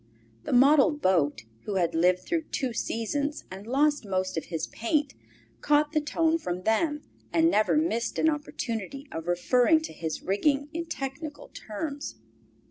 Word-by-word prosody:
The - - -3
model 275 +4 +6
boat, 175 - +1 0.2
who 205 - -3
had 170 -3 +1
lived 180 +2 +3
through 330 -2 -1
two 255 -3 -1
seasons 285 +7 -2
and 195 +3 -9
lost 290 +3 +2
most 185 -2 -2
of 160 - -3
his 165 -2 -3
paint, 285 +4 -1 0.5
caught 295 0 +3
the 310 -1 +1
tone 325 +2 +1
from 180 - -4
them 295 - +1 0.3
and 330 0 +4
never 215 +5 +3
missed 305 -7 0
an - - +3
opportunity 275 -4 -3
of 165 +1 -6
referring 245 - +3
to 320 - -7
his 160 -2 -4
rigging 280 +9 +1
in 335 +1 -4
technical 290 +1 -6
terms. 280 +7 -6
270 Hz, 155 wpm, -27 LUFS, 190-300 Hz, 0.5 s, model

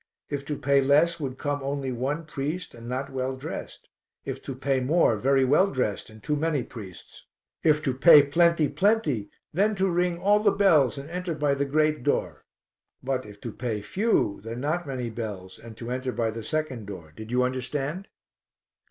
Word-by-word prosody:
If 140 -1 -3
to 150 0 -3
pay 140 0 +3
less 155 +5 +3
would 130 -3 -4
come 145 +1 -2
only 135 -1 -2
one 135 +7 -2
priest 155 +4 -4
and 115 0 -10
not 135 +2 -3
well 130 0 -2
dressed, 130 - -7 0.4
if - - -5
to 135 - -6
pay 135 0 0
more, 130 -1 +3
very 135 +5 +3
well 150 +9 +4
dressed 125 - -2
and 110 -1 -15
too 150 - 0
many 150 -3 0
priests. 100 -8 -11 0.3
If 155 -1 +3
to 135 -4 0
pay 145 +2 +8
plenty, 165 +2 +3
plenty, 170 - +1 0.2
then 205 +6 +2
to 190 0 +1
ring 175 0 +1
all 205 +3 +4
the 210 -1 +4
bells 155 - +4
and 140 +1 -7
enter 180 -2 -3
by 150 -2 +1
the 140 0 0
great 155 +1 +1
door; - - -1 0.6
but 130 -2 -2
if 100 -1 -12
to 115 - -5
pay 110 -3 -4
few, 185 - 0
then 115 +3 -6
not 155 +5 -1
many 125 -4 -3
bells 105 -5 -6
and 115 -1 -12
to 120 +1 -6
enter 130 0 -2
by 115 -2 -1
the 115 +1 -6
second 130 -4 -3
door. 85 -6 -9
Did 110 0 -9
you 125 +1 +2
understand? 135 - -2
135 Hz, 190 wpm, -26 LUFS, 120-155 Hz, 0.6 s, pay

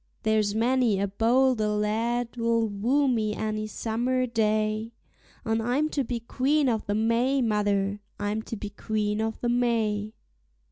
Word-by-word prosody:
There's 215 -1 +1
many 235 -2 +2
a 200 - +1
bolder 230 +2 +2
lad'll 230 +2 0
woo 245 +8 +1
me 215 -4 0
any 215 0 -2
summer 240 +4 -1
day; 215 -1 0 0.5
And 225 0 0
I'm 260 +7 +1
to 285 -3 -1
be 240 -1 -3
Queen 275 +5 +1
o'the 215 -3 -1
May, 230 +5 +2
mother, 205 -2 0 0.2
I'm 205 +2 -1
to - - -3
be 205 0 -6
Queen 210 0 -2
o'the 220 +2 -2
May. 225 -3 0
225 Hz, 135 wpm, -26 LUFS, 210-245 Hz, 0.5 s, many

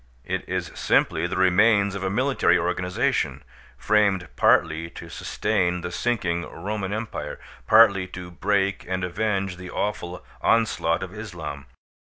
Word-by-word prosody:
It - - -4
is - - -2
simply - - +1
the - - -4
remains 100 +2 +4
of 100 - -5
a 95 - 0
military 130 -2 +2
organization, 90 +1 -1 0.3
framed 100 -4 +2
partly 80 +1 +3
to - - -10
sustain 90 -5 -1
the 90 +1 -5
sinking 90 -6 -1
Roman 95 +3 -4
Empire, 105 -9 -4 0.3
partly 100 -4 +6
to 90 -1 -9
break 100 +2 0
and 95 0 -2
avenge 95 0 -1
the 90 0 -9
awful 90 -4 -3 0.2
onslaught 105 -7 +2
of 95 -1 -7
Islam. 85 -10 -7
95 Hz, 135 wpm, -24 LUFS, 90-105 Hz, 0.3 s, partly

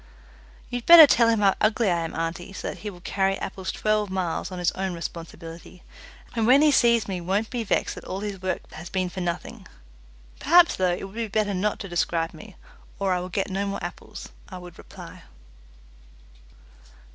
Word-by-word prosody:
"You'd 245 -1 -5
better 335 -2 +11
tell 240 -4 +4
him 225 -2 +2
how 195 -1 +4
ugly 215 -1 +2
I 170 - +1
am, 165 0 -5
auntie, 165 +3 -4
so - - -5
that - - -8
he 210 - -5
will 180 -3 -12
carry 195 +1 0
apples 190 -1 -5
twelve 215 -1 0
miles 185 -1 -3
on 185 - -6
his 175 -1 +1
own 190 -1 -3
responsibility, 165 +1 -9 0.5
and 225 -1 +1
when 270 +4 +6
he 305 - +5
sees 235 -4 +3
me 185 -3 -4
won't 195 +5 -1
be 240 -2 -2
vexed 215 - 0
that - - -11
all 190 +1 -5
his 205 -3 -5
work 185 0 -2
has 170 +2 -9
been 185 -1 -1
for 190 - -5
nothing. 170 -1 -5 0.7
Perhaps, 345 +3 +5
though, 185 -1 +1
it - - -8
would 195 0 -8
be 230 0 -3
better 210 -1 0
not 200 +3 -1
to 200 - -6
describe 170 -2 -1
me, 210 -3 -13 0.4
or 195 -2 0
I 180 - 0
will 180 +1 -6
get 195 +1 -2
no 195 +1 -2
more 200 - -4
apples," - - -8 0.2
I 185 - -8
would 180 -1 -12
reply. - - -12
195 Hz, 200 wpm, -25 LUFS, 180-215 Hz, 0.7 s, better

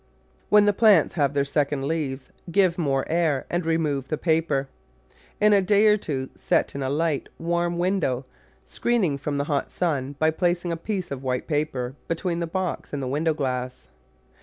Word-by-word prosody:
When 210 0 +6
the 205 - +4
plants 200 -7 +5
have 145 -3 0
their 140 -1 +2
second 140 -1 0
leaves 140 -4 -3 0.2
give 185 -2 +3
more 135 -4 +1
air 160 -5 +1
and 175 +1 0
remove 155 -5 0
the 155 - -2
paper; 155 -4 +1 0.7
in 210 0 +5
a 200 - +5
day 205 +2 +3
or 210 -1 +6
two 135 -10 -4
set - - 0
in 140 - -5
a 130 - -1
light, 150 0 -1
warm 170 +1 -1
window, 175 -8 0 0.4
screening 185 - 0
from 145 0 -3
the 140 - 0
hot 145 -1 -2
sun 145 -6 -1
by 160 +1 +3
placing 175 +1 0
a - - 0
piece 185 +1 -4
of 135 -2 -4
white 125 -2 -2
paper 145 -5 -2
between 170 +1 -2
the 170 - -2
box 185 -2 -3
and 140 -2 -2
the - - -3
window 155 +4 0
glass. 130 -3 -3
160 Hz, 185 wpm, -24 LUFS, 140-175 Hz, 0.7 s, When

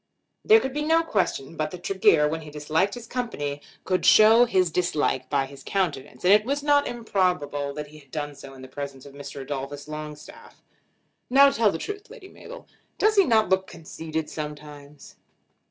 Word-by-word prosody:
There 440 0 +7
could 265 -10 -4
be 295 - -2
no 325 +2 +3
question 185 - -2
but 155 -1 -2
that 180 +2 -10
Tregear, 165 -6 +3
when 160 +2 -3
he 155 - -10
disliked 155 +7 -1
his 240 -1 -9
company, 145 - -4 0.2
could 185 -1 -1
show 225 +3 +7
his 185 -7 +1
dislike 150 -7 -1
by 140 -2 +1
his 135 0 -13
countenance; 145 -10 -3
and 190 - +7
it 210 0 +5
was 280 +4 -2
not 290 -1 +3
improbable 180 -11 -1
that 150 - -5
he 155 +1 -14
had 140 -2 -21
done 145 +1 -4
so 135 -1 -12
in 130 - -12
the - - -9
presence 140 0 -7
of 140 - -12
Mr. 140 0 -8
Adolphus 140 +1 -6
Longstaff. 150 0 -10 0.7
"Now 275 +2 +6
tell 220 -5 +2
the 165 - -4
truth, 415 - -7
Lady 445 -6 -13
Mabel; - - -12 0.3
does 430 +1 +3
he 395 -2 +5
not 220 -5 +3
look 190 0 +1
conceited 160 -1 -6
sometimes?" 150 -1 -9
160 Hz, 185 wpm, -25 LUFS, 145-230 Hz, 0.7 s, There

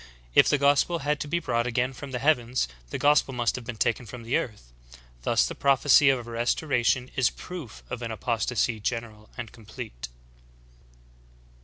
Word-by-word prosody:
If - - +6
the 145 - +3
gospel 145 +4 +3
had 150 0 +1
to - - -4
be 170 - 0
brought 120 -7 0
again 125 +2 0
from 140 +2 -8
the 130 - -3
heavens, 125 - +1 0.2
the - - -3
gospel 145 -2 +3
must 120 -2 +1
have 125 - -6
been 120 - -5
taken 120 +1 0
from 120 +2 -9
the 115 +3 -1
earth. 60 - -4 0.5
Thus - - +2
the - - -4
prophecy 140 +1 +5
of 125 -3 +1
a 120 - -9
restoration 125 +1 +1
is 130 - +3
proof 170 -11 -9
of 125 - -5
an 115 - -4
apostasy 115 0 -1
general 110 -1 -4
and 120 -3 -6
complete. 110 - -9
125 Hz, 175 wpm, -26 LUFS, 115-135 Hz, 0.5 s, If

